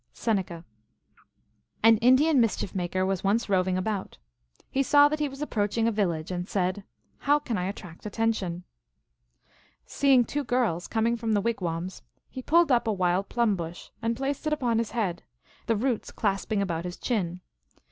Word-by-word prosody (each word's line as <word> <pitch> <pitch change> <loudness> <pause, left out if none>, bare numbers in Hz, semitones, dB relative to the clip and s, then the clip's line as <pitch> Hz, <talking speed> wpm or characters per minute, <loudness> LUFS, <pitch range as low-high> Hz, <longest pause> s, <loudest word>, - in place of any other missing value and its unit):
(Seneca.) 185 -7 -2 1.2
An 225 0 +7
Indian 260 +5 +5
mischief 220 -4 -1
maker 185 0 -1
was 190 -1 -1
once 210 +4 +1
roving 185 -2 +1
about. 195 0 -3 0.5
He 270 - 0
saw 290 +2 +6
that 305 +1 -2
he 295 -1 0
was 275 +2 -6
approaching 225 -3 0
a - - +2
village, 175 -6 -1
and 180 +1 -4
said, 185 +1 -1 0.2
" - - -42
How 290 +1 +6
can 255 -6 -3
I 180 -2 -1
attract 185 -1 -8
attention? 205 -5 -1 0.6
" - - -36 0.2
Seeing 270 -3 +3
two 290 +5 -2
girls 240 -9 0
coming 230 +1 +1
from 225 -1 -1
the 205 - +3
wigwams, 185 -5 -3 0.3
he 260 - -6
pulled 335 +2 +3
up 240 -2 +3
a - - +2
wild 185 0 0
plum 235 -4 +2
bush 170 -1 -7
and 230 0 -1
placed 275 +3 -2
it 305 - +1
upon 240 -6 +1
his 230 - -1
head, 185 -7 -2 0.5
the 230 - +2
roots 235 +1 -1
clasping 200 0 -1
about 170 -3 -2
his 180 0 -6
chin. 180 -7 -2
215 Hz, 175 wpm, -27 LUFS, 185-245 Hz, 1.2 s, An